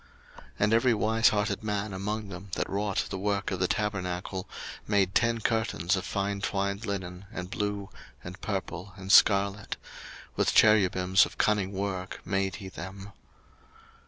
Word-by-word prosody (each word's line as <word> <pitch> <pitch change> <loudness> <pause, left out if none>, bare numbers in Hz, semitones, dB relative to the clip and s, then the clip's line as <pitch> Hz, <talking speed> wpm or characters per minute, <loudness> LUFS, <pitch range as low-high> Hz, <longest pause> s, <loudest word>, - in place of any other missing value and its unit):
02:036:008 - - -14 0.2
And 105 +2 +3
every 115 +2 +4
wise 110 +1 +4
hearted 105 +1 -1
man 105 -1 -2
among 105 +2 -3
them 95 +1 -8
that - - -1
wrought 100 0 -1
the 95 - -3
work 100 0 -1
of 95 - -2
the 90 - +2
tabernacle 95 -2 -2 0.4
made 100 -3 +2
ten 115 +1 +2
curtains 110 -5 +1
of 95 - -3
fine 100 0 -2
twined 100 +2 -1
linen, 95 -1 -4
and 90 -3 -6
blue, 100 -1 -2 0.4
and - - -9
purple, 95 +3 -4
and 95 0 -4
scarlet: 100 0 +4 0.6
with - - +1
cherubims 95 -3 +5
of - - -14
cunning 100 -3 +2
work 95 -1 -3
made 95 0 0
he 100 -4 -8
them. 95 +2 -8
100 Hz, 155 wpm, -28 LUFS, 95-105 Hz, 0.6 s, cherubims